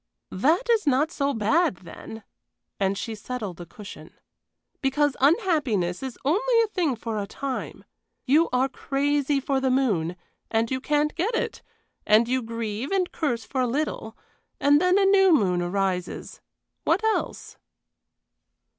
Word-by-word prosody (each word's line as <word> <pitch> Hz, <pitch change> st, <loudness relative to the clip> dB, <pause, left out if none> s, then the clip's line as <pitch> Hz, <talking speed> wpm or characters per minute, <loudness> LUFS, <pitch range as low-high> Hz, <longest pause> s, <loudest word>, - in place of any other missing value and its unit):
"That 315 Hz, -, +2 dB
is 455 Hz, -7 st, +2 dB
not 285 Hz, +4 st, +2 dB
so 280 Hz, 0 st, 0 dB
bad 260 Hz, -, +2 dB
then," 190 Hz, +5 st, -11 dB, 0.6 s
and 195 Hz, 0 st, +1 dB
she 225 Hz, -, -4 dB
settled 210 Hz, -5 st, -6 dB
a 175 Hz, -, -9 dB
cushion. 205 Hz, +4 st, -11 dB, 0.7 s
"Because 290 Hz, +1 st, +1 dB
unhappiness 280 Hz, -, +2 dB
is 265 Hz, -2 st, -6 dB
only 460 Hz, -, +3 dB
a -, -, -1 dB
thing 345 Hz, -10 st, 0 dB
for 225 Hz, -1 st, -4 dB
a 200 Hz, -, -5 dB
time. 270 Hz, +3 st, -5 dB, 0.4 s
You 300 Hz, +5 st, +4 dB
are 255 Hz, +1 st, +2 dB
crazy 285 Hz, +1 st, 0 dB
for 270 Hz, 0 st, 0 dB
the 265 Hz, -, +1 dB
moon, 205 Hz, -11 st, +1 dB, 0.3 s
and 225 Hz, +1 st, 0 dB
you 260 Hz, 0 st, -1 dB
can't 295 Hz, +2 st, +1 dB
get 405 Hz, +7 st, -1 dB
it, -, -, -2 dB, 0.4 s
and 215 Hz, +2 st, +4 dB
you 255 Hz, +1 st, 0 dB
grieve 230 Hz, +2 st, -4 dB
and 380 Hz, -2 st, 0 dB
curse 245 Hz, -8 st, -2 dB
for 260 Hz, +5 st, -2 dB
a 250 Hz, -, +1 dB
little, 240 Hz, -4 st, -3 dB, 0.4 s
and 290 Hz, +2 st, +4 dB
then 365 Hz, +1 st, +4 dB
a 400 Hz, -, +4 dB
new 385 Hz, -3 st, +6 dB
moon 180 Hz, -9 st, +1 dB
arises. 180 Hz, 0 st, -2 dB, 0.4 s
What 420 Hz, -, +1 dB
else?" 440 Hz, -1 st, -2 dB
265 Hz, 150 wpm, -25 LUFS, 220-310 Hz, 0.7 s, new